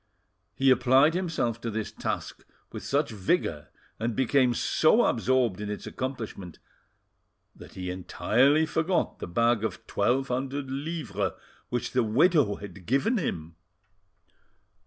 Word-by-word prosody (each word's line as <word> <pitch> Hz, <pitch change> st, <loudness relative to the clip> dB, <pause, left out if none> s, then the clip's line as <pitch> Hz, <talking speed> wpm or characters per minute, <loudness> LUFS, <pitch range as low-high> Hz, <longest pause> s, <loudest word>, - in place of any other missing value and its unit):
He 135 Hz, 0 st, +4 dB
applied 130 Hz, +5 st, +5 dB
himself 155 Hz, -11 st, -1 dB
to 115 Hz, -, -3 dB
this 110 Hz, -1 st, -4 dB
task -, -, -4 dB, 0.3 s
with -, -, -7 dB
such 145 Hz, -1 st, 0 dB
vigour, 95 Hz, -, -1 dB, 0.3 s
and 115 Hz, 0 st, -2 dB
became 130 Hz, -1 st, +2 dB
so 215 Hz, -, +3 dB
absorbed 120 Hz, -4 st, +1 dB
in 105 Hz, -, -4 dB
its 105 Hz, -, -5 dB
accomplishment, 110 Hz, -, -6 dB, 1.0 s
that -, -, -13 dB
he 90 Hz, -1 st, -4 dB
entirely 130 Hz, -, +2 dB
forgot 170 Hz, +3 st, -1 dB
the -, -, -5 dB
bag 115 Hz, +5 st, +2 dB
of 110 Hz, 0 st, -4 dB
twelve 125 Hz, +7 st, 0 dB
hundred 135 Hz, +2 st, -3 dB
livres 135 Hz, -, -3 dB, 0.4 s
which 120 Hz, -1 st, -2 dB
the 125 Hz, -, +2 dB
widow 125 Hz, -, +3 dB
had 100 Hz, -3 st, -11 dB
given 140 Hz, -, +2 dB
him. 80 Hz, -, -4 dB
125 Hz, 130 wpm, -27 LUFS, 105-140 Hz, 1.0 s, applied